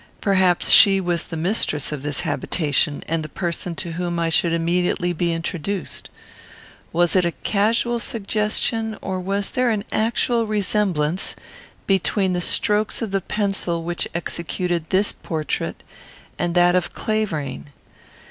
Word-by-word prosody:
Perhaps 185 Hz, -3 st, +3 dB
she 195 Hz, -1 st, +8 dB
was 175 Hz, -3 st, -1 dB
the 165 Hz, -, -6 dB
mistress 160 Hz, -5 st, 0 dB
of 150 Hz, -3 st, -4 dB
this 145 Hz, -1 st, -1 dB
habitation, 150 Hz, -2 st, 0 dB
and 165 Hz, 0 st, -1 dB
the 155 Hz, -, -7 dB
person 170 Hz, +1 st, -3 dB
to 175 Hz, -2 st, -4 dB
whom 175 Hz, 0 st, -3 dB
I 165 Hz, -1 st, 0 dB
should 165 Hz, +1 st, +2 dB
immediately 175 Hz, +1 st, 0 dB
be 170 Hz, +1 st, 0 dB
introduced. 170 Hz, +3 st, -3 dB, 0.8 s
Was 175 Hz, +1 st, +2 dB
it 185 Hz, -, +4 dB
a 170 Hz, -1 st, 0 dB
casual 230 Hz, +3 st, +1 dB
suggestion, 220 Hz, +1 st, -1 dB
or 190 Hz, -1 st, -3 dB
was 195 Hz, +2 st, -2 dB
there 255 Hz, -1 st, +1 dB
an 215 Hz, -3 st, 0 dB
actual 230 Hz, +1 st, +1 dB
resemblance 190 Hz, -5 st, 0 dB, 0.5 s
between 195 Hz, 0 st, +1 dB
the 180 Hz, -, -1 dB
strokes 210 Hz, +5 st, +1 dB
of 215 Hz, -, -4 dB
the 195 Hz, 0 st, 0 dB
pencil 195 Hz, -5 st, -1 dB
which 175 Hz, +1 st, -1 dB
executed 170 Hz, 0 st, -3 dB
this 195 Hz, +2 st, +2 dB
portrait 155 Hz, -3 st, -4 dB, 0.6 s
and 175 Hz, 0 st, -1 dB
that 175 Hz, 0 st, +5 dB
of 180 Hz, -2 st, 0 dB
Clavering? 155 Hz, -, -2 dB
180 Hz, 140 wpm, -22 LUFS, 170-205 Hz, 0.8 s, she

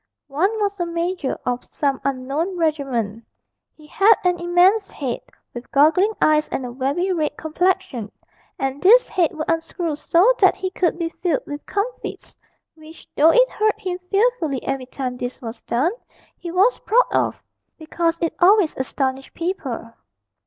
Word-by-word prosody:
One 310 Hz, +8 st, +1 dB
was 405 Hz, -1 st, -1 dB
a 350 Hz, -, 0 dB
major 340 Hz, -3 st, -2 dB
of 250 Hz, 0 st, -2 dB
some 275 Hz, -2 st, -2 dB
unknown 275 Hz, +7 st, -2 dB
regiment; 265 Hz, -9 st, -1 dB, 0.5 s
he 305 Hz, -, -16 dB
had 400 Hz, +8 st, +4 dB
an 360 Hz, -1 st, +1 dB
immense 360 Hz, +4 st, +3 dB
head, 260 Hz, -5 st, -4 dB, 0.3 s
with 240 Hz, 0 st, -9 dB
goggling 325 Hz, +9 st, +4 dB
eyes 305 Hz, 0 st, +3 dB
and 260 Hz, -, -4 dB
a 245 Hz, -, -6 dB
very 280 Hz, +9 st, -1 dB
red 305 Hz, -3 st, -2 dB
complexion, 320 Hz, -, -1 dB, 0.5 s
and 270 Hz, 0 st, -3 dB
this 465 Hz, +7 st, +6 dB
head 350 Hz, -5 st, +1 dB
would 310 Hz, 0 st, -4 dB
unscrew 330 Hz, -1 st, -2 dB
so 350 Hz, +10 st, +3 dB
that 385 Hz, -, +5 dB
he 375 Hz, -1 st, -4 dB
could 360 Hz, -2 st, 0 dB
be 335 Hz, -1 st, -2 dB
filled 335 Hz, -3 st, -2 dB
with 290 Hz, 0 st, -7 dB
comfits, 425 Hz, +5 st, -4 dB, 0.4 s
which, 315 Hz, 0 st, -15 dB
though 310 Hz, +3 st, +6 dB
it -, -, +4 dB
hurt 430 Hz, 0 st, 0 dB
him 365 Hz, -1 st, -4 dB
fearfully 395 Hz, -, +1 dB
every 270 Hz, -2 st, -3 dB
time 255 Hz, -1 st, -5 dB
this 245 Hz, 0 st, -5 dB
was 230 Hz, -1 st, -8 dB
done, 270 Hz, +9 st, 0 dB, 0.4 s
he 345 Hz, -, -8 dB
was 390 Hz, +8 st, +3 dB
proud -, -, +3 dB
of, -, -, 0 dB, 0.3 s
because 330 Hz, +1 st, -1 dB
it 330 Hz, -, 0 dB
always 380 Hz, -2 st, +4 dB
astonished 265 Hz, 0 st, -3 dB
people. 275 Hz, -10 st, -4 dB
330 Hz, 160 wpm, -21 LUFS, 270-370 Hz, 0.5 s, this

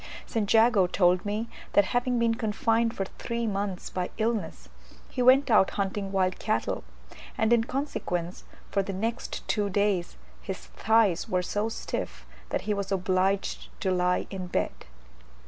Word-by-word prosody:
St. 215 Hz, -4 st, -1 dB
Jago 225 Hz, -4 st, +5 dB
told 180 Hz, +1 st, +2 dB
me, 215 Hz, +3 st, -2 dB, 0.3 s
that 205 Hz, -, +5 dB
having 245 Hz, 0 st, +1 dB
been 230 Hz, -1 st, +3 dB
confined 225 Hz, 0 st, +1 dB
for 195 Hz, -, -2 dB
three 235 Hz, 0 st, -2 dB
months 200 Hz, -3 st, -3 dB
by 180 Hz, -1 st, -2 dB
illness, 220 Hz, 0 st, -2 dB, 0.4 s
he 255 Hz, -, -2 dB
went 260 Hz, +1 st, +5 dB
out 200 Hz, -3 st, +6 dB
hunting 195 Hz, 0 st, -2 dB
wild 185 Hz, -1 st, +1 dB
cattle, 215 Hz, -, -1 dB, 0.5 s
and 220 Hz, +2 st, +3 dB
in 230 Hz, -1 st, +3 dB
consequence, 180 Hz, -, -3 dB, 0.3 s
for 200 Hz, -, +2 dB
the 195 Hz, 0 st, -4 dB
next 225 Hz, +5 st, -3 dB
two 205 Hz, -2 st, +1 dB
days, 200 Hz, -, 0 dB, 0.2 s
his 60 Hz, 0 st, -6 dB
thighs 205 Hz, -, +2 dB
were 180 Hz, 0 st, +1 dB
so 205 Hz, +4 st, -1 dB
stiff 60 Hz, -, -5 dB, 0.2 s
that -, -, -1 dB
he 210 Hz, +1 st, -1 dB
was 200 Hz, -1 st, -3 dB
obliged 190 Hz, +1 st, 0 dB
to 190 Hz, -, +1 dB
lie 180 Hz, 0 st, +1 dB
in 185 Hz, -2 st, -5 dB
bed. -, -, 0 dB
205 Hz, 155 wpm, -28 LUFS, 185-225 Hz, 0.5 s, out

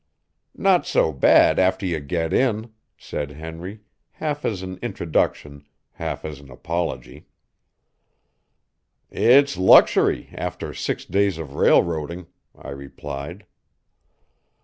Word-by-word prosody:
"Not -, -, +2 dB
so 80 Hz, -, +2 dB
bad 70 Hz, -, +5 dB
after 95 Hz, +1 st, +1 dB
you 85 Hz, -4 st, -1 dB
get 80 Hz, +3 st, -3 dB
in," 110 Hz, -3 st, 0 dB, 0.2 s
said 75 Hz, -1 st, -5 dB
Henry, 80 Hz, +7 st, -9 dB, 0.3 s
half 150 Hz, -2 st, -4 dB
as 95 Hz, -4 st, -2 dB
an 95 Hz, 0 st, -7 dB
introduction, 70 Hz, 0 st, -2 dB, 0.3 s
half -, -, -5 dB
as 75 Hz, -3 st, -7 dB
an 70 Hz, -1 st, -16 dB
apology. 85 Hz, +6 st, -5 dB, 1.8 s
"It's 140 Hz, +3 st, +4 dB
luxury 95 Hz, 0 st, +4 dB
after -, -, -5 dB
six -, -, -4 dB
days 100 Hz, -1 st, +1 dB
of 75 Hz, -4 st, -8 dB
railroading," 85 Hz, +3 st, +1 dB, 0.3 s
I -, -, -10 dB
replied. 70 Hz, +6 st, -8 dB
85 Hz, 105 wpm, -22 LUFS, 75-100 Hz, 1.8 s, bad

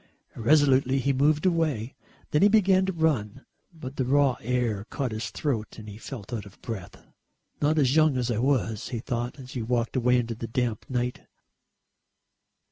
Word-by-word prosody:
Irresolutely 135 Hz, +1 st, +3 dB
he 135 Hz, +1 st, +1 dB
moved 150 Hz, +4 st, +2 dB
away. 155 Hz, -9 st, 0 dB, 0.4 s
Then 150 Hz, -, +2 dB
he 205 Hz, -, +7 dB
began 195 Hz, -3 st, +4 dB
to -, -, +1 dB
run, 140 Hz, -, -1 dB, 0.3 s
but 145 Hz, -5 st, -9 dB
the 130 Hz, -, +1 dB
raw 135 Hz, 0 st, +3 dB
air 120 Hz, -4 st, -1 dB
caught 130 Hz, +1 st, -3 dB
his 110 Hz, +1 st, -4 dB
throat 120 Hz, -8 st, -3 dB
and 110 Hz, -1 st, -10 dB
he 105 Hz, +1 st, -9 dB
felt 120 Hz, -2 st, -8 dB
out 105 Hz, -3 st, -4 dB
of 100 Hz, -, -17 dB
breath. 105 Hz, -6 st, -6 dB, 0.7 s
"Not 150 Hz, +2 st, +2 dB
as 135 Hz, -2 st, +3 dB
young 155 Hz, -4 st, +4 dB
as 125 Hz, -1 st, 0 dB
I 110 Hz, -, -1 dB
was," 120 Hz, -4 st, 0 dB
he 125 Hz, -, -3 dB
thought 120 Hz, +2 st, -3 dB
as 130 Hz, -1 st, -10 dB
he 125 Hz, -, -4 dB
walked 120 Hz, +1 st, -1 dB
away 125 Hz, 0 st, +3 dB
into 115 Hz, -1 st, -1 dB
the 115 Hz, +1 st, -6 dB
damp 115 Hz, -2 st, -2 dB
night. 125 Hz, -1 st, -2 dB
125 Hz, 180 wpm, -26 LUFS, 115-145 Hz, 0.7 s, he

